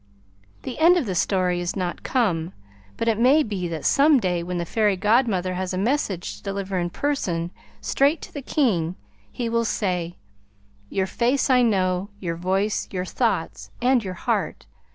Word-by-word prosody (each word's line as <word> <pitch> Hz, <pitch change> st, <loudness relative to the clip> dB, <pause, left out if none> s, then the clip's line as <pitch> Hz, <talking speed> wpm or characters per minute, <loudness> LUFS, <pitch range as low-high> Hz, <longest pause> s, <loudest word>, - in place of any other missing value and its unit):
The 260 Hz, -, -6 dB
end 345 Hz, +3 st, +6 dB
of 325 Hz, -, 0 dB
the 195 Hz, -, -2 dB
story 180 Hz, 0 st, +1 dB
is 175 Hz, +1 st, -3 dB
not 180 Hz, -3 st, -3 dB
come, 185 Hz, -9 st, 0 dB, 0.4 s
but 230 Hz, -, -2 dB
it 225 Hz, -1 st, +2 dB
may 275 Hz, +6 st, +5 dB
be 195 Hz, -6 st, -3 dB
that 165 Hz, -2 st, -5 dB
some 285 Hz, 0 st, +5 dB
day 180 Hz, -5 st, 0 dB
when 180 Hz, +1 st, -4 dB
the 170 Hz, -, -2 dB
Fairy 210 Hz, +2 st, +2 dB
Godmother 205 Hz, -3 st, +2 dB
has 185 Hz, 0 st, -3 dB
a -, -, -2 dB
message 200 Hz, -, -1 dB
to -, -, -17 dB
deliver 195 Hz, -1 st, -3 dB
in 175 Hz, 0 st, -1 dB
person 175 Hz, -9 st, -2 dB, 0.3 s
straight 285 Hz, +4 st, +2 dB
to -, -, -10 dB
the 285 Hz, -, -5 dB
King, 185 Hz, -, 0 dB, 0.4 s
he 240 Hz, -2 st, -3 dB
will 230 Hz, 0 st, +1 dB
say: 180 Hz, -5 st, -2 dB, 0.7 s
"Your 190 Hz, -, 0 dB
face 250 Hz, +7 st, +1 dB
I 250 Hz, -1 st, +5 dB
know; 190 Hz, -4 st, +1 dB
your 170 Hz, -4 st, -3 dB
voice, 190 Hz, +4 st, 0 dB
your 185 Hz, -1 st, -3 dB
thoughts, -, -, -1 dB
and 250 Hz, -1 st, +3 dB
your 185 Hz, -2 st, -5 dB
heart. -, -, -2 dB
195 Hz, 175 wpm, -24 LUFS, 180-245 Hz, 0.7 s, end